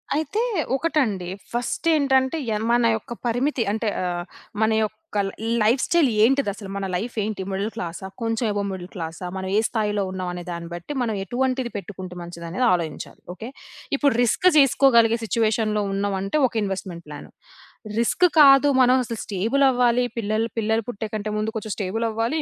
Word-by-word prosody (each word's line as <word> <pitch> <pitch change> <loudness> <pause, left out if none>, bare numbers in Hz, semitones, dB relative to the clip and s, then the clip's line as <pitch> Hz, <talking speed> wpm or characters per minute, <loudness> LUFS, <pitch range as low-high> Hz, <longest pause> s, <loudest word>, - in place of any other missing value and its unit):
అయితే, 315 +9 -1 0.3
ఒకటండి 255 - 0 0.2
ఫస్టేంటంటే, 265 +2 +1 0.2
ఎన్ 215 +2 -2
మన 240 -1 +3
యొక్క 230 +2 -6
పరిమితి 245 +2 +1
అంటే 220 +1 -2 0.2
ఆహ్, 175 -1 -2 0.4
మన 220 0 +3
యొక్క 215 - -1 0.4
ల్ - - -4 0.3
లైఫ్ 240 +5 +3
స్టైల్ 340 -5 +3 0.2
ఏంటిదసల, 220 -6 +1
మన 200 -1 -2
లైఫేంటి, 215 0 -3
మిడిల్ 200 +3 -2
క్లాసా, 175 -1 -5
కొంచెం 225 +1 -1
అబోవ్ 200 -1 -1
మిడిల్ 185 -1 -7
క్లాసా, 165 +1 -5
మనం 190 0 -4
ఏ - - +6
స్థాయిలో 210 -3 -1
ఉన్నాం 185 -1 -4
అనే 175 0 -6
దాన్ని 170 0 -6
బట్టి, 175 - -6
మనం 225 -3 -1
ఎటువంటిది 255 +2 -1
పెట్టుకుంటే 185 -2 -8
మంచిదనేది 170 +6 -3
ఆలోచించాలి. 165 -4 -4
ఓకే. 220 +7 -8 0.5
ఇప్పుడు 280 -3 +3
రిస్క్ 300 +10 +2
చేసుకోగలిగే 235 -5 +5
సిట్యుయేషన్‌లో 215 -1 +1
ఉన్నాం 200 0 -1
అంటే 195 +10 0
ఒక - - -15
ఇన్‌వెస్ట్‌మెంట్ 185 -3 -4
ప్లాను. 145 -1 -9 0.7
రిస్క్ 235 +9 +3 0.2
కాదు 275 0 +8
మనం 250 +1 +5
అసలు 230 -2 -5
స్టేబులవ్వాలి, 245 +4 +2
పిల్లల్ 220 +1 0
పిల్లలు 220 0 +1
పుట్టే 220 -1 -4
కంటే 215 0 -3
ముందు 220 +1 -2
కొంచెం 215 -1 -4
స్టేబులవ్వాలి. 225 +7 -1
220 Hz, 155 wpm, -23 LUFS, 195-250 Hz, 0.7 s, కాదు